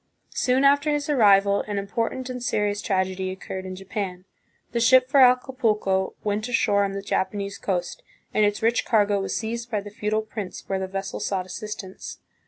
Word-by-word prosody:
Soon 255 Hz, +2 st, +2 dB
after 285 Hz, +2 st, +4 dB
his 295 Hz, 0 st, 0 dB
arrival 200 Hz, -5 st, +5 dB
an 205 Hz, -1 st, -3 dB
important 230 Hz, +5 st, -2 dB
and 250 Hz, -1 st, -5 dB
serious 210 Hz, -3 st, 0 dB
tragedy 190 Hz, -2 st, -1 dB
occurred 190 Hz, 0 st, -6 dB
in 185 Hz, -, -6 dB
Japan. 190 Hz, -1 st, -5 dB, 0.5 s
The 235 Hz, -, 0 dB
ship 255 Hz, +2 st, +5 dB
for 275 Hz, +1 st, +3 dB
Acapulco 240 Hz, -7 st, +3 dB
went 215 Hz, +3 st, -1 dB
ashore 205 Hz, -4 st, +2 dB
on 195 Hz, -1 st, -2 dB
the 195 Hz, 0 st, -5 dB
Japanese 200 Hz, +1 st, -2 dB
coast 180 Hz, -3 st, -2 dB, 0.3 s
and 215 Hz, -, +3 dB
its 205 Hz, +1 st, +1 dB
rich 230 Hz, +1 st, +2 dB
cargo 205 Hz, -3 st, +2 dB
was 195 Hz, -, -3 dB
seized 235 Hz, +1 st, -4 dB
by 215 Hz, -3 st, 0 dB
the 205 Hz, +1 st, -10 dB
feudal 215 Hz, 0 st, -1 dB
prince 210 Hz, -4 st, -7 dB
where 195 Hz, -1 st, -1 dB
the 190 Hz, -, -3 dB
vessel 195 Hz, 0 st, -4 dB
sought 190 Hz, -2 st, -2 dB
assist 210 Hz, +3 st, -6 dB
ance. 190 Hz, 0 st, -9 dB
205 Hz, 185 wpm, -24 LUFS, 195-235 Hz, 0.5 s, arrival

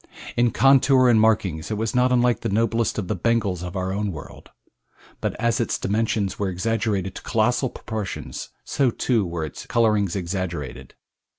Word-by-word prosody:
In 120 Hz, 0 st, +3 dB
contour 135 Hz, 0 st, +5 dB
and 110 Hz, -2 st, +5 dB
markings 95 Hz, -8 st, +1 dB
it 110 Hz, -, -2 dB
was 110 Hz, +1 st, -2 dB
not 125 Hz, 0 st, +3 dB
unlike 120 Hz, -3 st, +3 dB
the -, -, -3 dB
noblest 115 Hz, +2 st, +1 dB
of 100 Hz, -4 st, -2 dB
the 105 Hz, -, -1 dB
Bengals 100 Hz, -3 st, 0 dB
of 90 Hz, +1 st, -6 dB
our 95 Hz, 0 st, -2 dB
own 105 Hz, 0 st, -1 dB
world, 75 Hz, -5 st, -10 dB, 0.7 s
but -, -, -2 dB
as 115 Hz, 0 st, 0 dB
its 115 Hz, -, 0 dB
dimensions 105 Hz, -1 st, -1 dB
were 100 Hz, -2 st, 0 dB
exaggerated 100 Hz, 0 st, -1 dB
to -, -, -8 dB
colossal 120 Hz, +3 st, +1 dB
proportions 110 Hz, -4 st, -6 dB
so 135 Hz, -3 st, +1 dB
too 115 Hz, -1 st, +1 dB
were 85 Hz, -3 st, -3 dB
its 75 Hz, -, -9 dB
colorings 105 Hz, -5 st, +2 dB
exaggerated. 85 Hz, -8 st, -4 dB
110 Hz, 170 wpm, -23 LUFS, 95-115 Hz, 0.7 s, contour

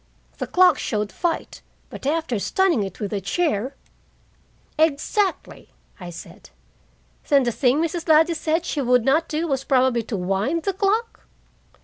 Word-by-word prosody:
The -, -, -3 dB
clock 365 Hz, 0 st, +4 dB
showed 210 Hz, -2 st, -2 dB
fight, 345 Hz, -2 st, -3 dB, 0.3 s
but -, -, -7 dB
after 310 Hz, -7 st, -1 dB
stunning 370 Hz, -, +1 dB
it 195 Hz, -2 st, -5 dB
with 205 Hz, -1 st, -4 dB
a 200 Hz, -, -2 dB
chair 260 Hz, -, -1 dB, 0.6 s
" -, -, -28 dB
"Exactly!" 380 Hz, +7 st, -3 dB, 0.3 s
I 180 Hz, -2 st, -8 dB
said. 170 Hz, -, -12 dB, 0.8 s
"Then 280 Hz, -3 st, +5 dB
the 240 Hz, -, 0 dB
thing 255 Hz, +4 st, +2 dB
Mrs. 335 Hz, +1 st, -3 dB
Ladley 320 Hz, +2 st, +5 dB
said 325 Hz, +1 st, -1 dB
she 295 Hz, -, -2 dB
would 250 Hz, -2 st, +2 dB
not 310 Hz, +5 st, +2 dB
do 320 Hz, +2 st, -2 dB
was 270 Hz, -3 st, -1 dB
probably 260 Hz, -3 st, +2 dB
to 220 Hz, -1 st, -5 dB
wind 195 Hz, -, -1 dB
the 395 Hz, -, -1 dB
clock?" 415 Hz, +4 st, -1 dB
280 Hz, 155 wpm, -22 LUFS, 230-335 Hz, 0.8 s, Then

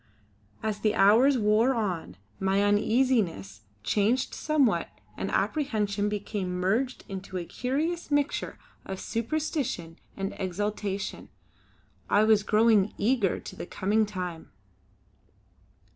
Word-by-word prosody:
As 215 Hz, -1 st, -2 dB
the 215 Hz, 0 st, +1 dB
hours 235 Hz, +8 st, +5 dB
wore 220 Hz, +4 st, +3 dB
on, 180 Hz, -, -3 dB, 0.2 s
my 195 Hz, +1 st, +2 dB
uneasiness 205 Hz, -, +1 dB, 0.2 s
changed 220 Hz, -, +1 dB
somewhat 270 Hz, -, +1 dB, 0.3 s
and -, -, -3 dB
apprehension 210 Hz, -5 st, 0 dB
became 200 Hz, -3 st, -3 dB
merged 225 Hz, +8 st, 0 dB
in 195 Hz, -3 st, -5 dB
a 175 Hz, -2 st, -2 dB
curious 305 Hz, -, -2 dB
mixture 290 Hz, -1 st, 0 dB, 0.3 s
of 190 Hz, -1 st, -6 dB
superstition 230 Hz, -, -3 dB, 0.2 s
and 195 Hz, 0 st, -3 dB
exaltation. 200 Hz, +1 st, -3 dB, 0.8 s
I 205 Hz, -, +4 dB
was 215 Hz, -1 st, +5 dB
growing 215 Hz, -1 st, +3 dB
eager 215 Hz, -3 st, +1 dB
to -, -, -9 dB
the -, -, -7 dB
coming 210 Hz, +3 st, +1 dB
time. 180 Hz, -5 st, -6 dB
210 Hz, 110 wpm, -28 LUFS, 195-240 Hz, 0.8 s, hours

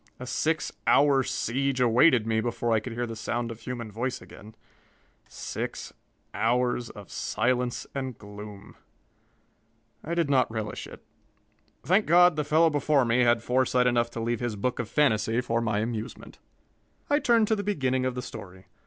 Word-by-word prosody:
A 125 Hz, -, -6 dB
six 155 Hz, +4 st, -1 dB, 0.2 s
hour 140 Hz, -1 st, +5 dB
siege 130 Hz, +1 st, -1 dB
awaited 125 Hz, 0 st, +4 dB
me 110 Hz, 0 st, +1 dB
before 120 Hz, 0 st, -2 dB
I 110 Hz, -, +4 dB
could 115 Hz, +2 st, -7 dB
hear 120 Hz, +1 st, -2 dB
the 115 Hz, -1 st, -6 dB
sound 120 Hz, +2 st, -3 dB
of 115 Hz, -, -9 dB
human 115 Hz, -2 st, -6 dB
voice 120 Hz, +4 st, -3 dB
again 110 Hz, +2 st, -14 dB, 0.7 s
six -, -, -6 dB, 0.4 s
hours 120 Hz, +1 st, 0 dB
of 100 Hz, -2 st, -12 dB
silence 120 Hz, +2 st, -1 dB
and 130 Hz, -3 st, -4 dB
gloom. 105 Hz, -1 st, -11 dB, 1.3 s
I 170 Hz, +2 st, -3 dB
did 170 Hz, -3 st, +1 dB
not 130 Hz, -3 st, +3 dB
relish 110 Hz, -2 st, -5 dB
it. -, -, -13 dB, 0.8 s
Thank 195 Hz, +4 st, +2 dB
God 175 Hz, 0 st, +6 dB
the 150 Hz, -, 0 dB
fellow 160 Hz, +2 st, +3 dB
before 145 Hz, -2 st, +2 dB
me 115 Hz, +1 st, +2 dB
had 125 Hz, -, +4 dB
had 120 Hz, -1 st, +3 dB
foresight 125 Hz, 0 st, +2 dB
enough 120 Hz, -1 st, +2 dB
to 120 Hz, -, -7 dB
leave 115 Hz, 0 st, -1 dB
his 120 Hz, -3 st, -2 dB
book 125 Hz, +5 st, -2 dB
of 120 Hz, -, -3 dB
fantasy 115 Hz, -5 st, +2 dB
for 115 Hz, -2 st, 0 dB
my 110 Hz, -2 st, 0 dB
amusement! 110 Hz, -1 st, -6 dB, 0.7 s
I 290 Hz, +1 st, +3 dB
turned 235 Hz, -6 st, +3 dB
to 220 Hz, -, +3 dB
the 205 Hz, -, -3 dB
beginning 130 Hz, -10 st, 0 dB
of 130 Hz, -1 st, -1 dB
the 125 Hz, -, -4 dB
story. 95 Hz, -5 st, -10 dB
125 Hz, 170 wpm, -27 LUFS, 115-140 Hz, 1.3 s, God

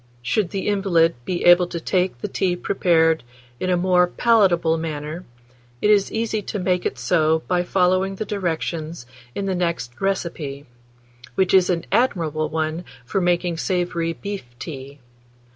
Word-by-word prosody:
Should 180 Hz, -, 0 dB
the 195 Hz, 0 st, -3 dB
invalid 185 Hz, -5 st, +3 dB
be 180 Hz, -2 st, -2 dB
able 175 Hz, 0 st, +7 dB
to 170 Hz, -, -5 dB
take 180 Hz, -6 st, -1 dB
the -, -, -2 dB
tea 180 Hz, -2 st, 0 dB
prepared 165 Hz, -5 st, +2 dB, 0.4 s
in 185 Hz, -, -2 dB
a 180 Hz, -, +3 dB
more 180 Hz, 0 st, +3 dB
palatable 180 Hz, -7 st, +3 dB
manner, 155 Hz, +2 st, -5 dB, 0.5 s
it 210 Hz, -, +3 dB
is 200 Hz, -2 st, +3 dB
easy 220 Hz, -1 st, -1 dB
to 205 Hz, -, -5 dB
make 180 Hz, -1 st, 0 dB
it -, -, -6 dB
so 160 Hz, -2 st, +2 dB
by 180 Hz, -1 st, +2 dB
following 185 Hz, +1 st, +1 dB
the 215 Hz, -, -4 dB
directions 165 Hz, -6 st, -3 dB, 0.3 s
in 200 Hz, -, -2 dB
the 195 Hz, -, 0 dB
next 170 Hz, -9 st, -3 dB
recipe, 165 Hz, -7 st, -3 dB, 0.7 s
which 190 Hz, -2 st, +2 dB
is 185 Hz, -2 st, +5 dB
an 170 Hz, -2 st, 0 dB
admirable 165 Hz, -, +1 dB
one 160 Hz, +2 st, -2 dB, 0.2 s
for 195 Hz, +10 st, -1 dB
making 175 Hz, -1 st, +1 dB
savoury 175 Hz, -1 st, -1 dB
beef 200 Hz, +2 st, -6 dB
tea. 140 Hz, -1 st, -8 dB
175 Hz, 155 wpm, -22 LUFS, 160-190 Hz, 0.7 s, able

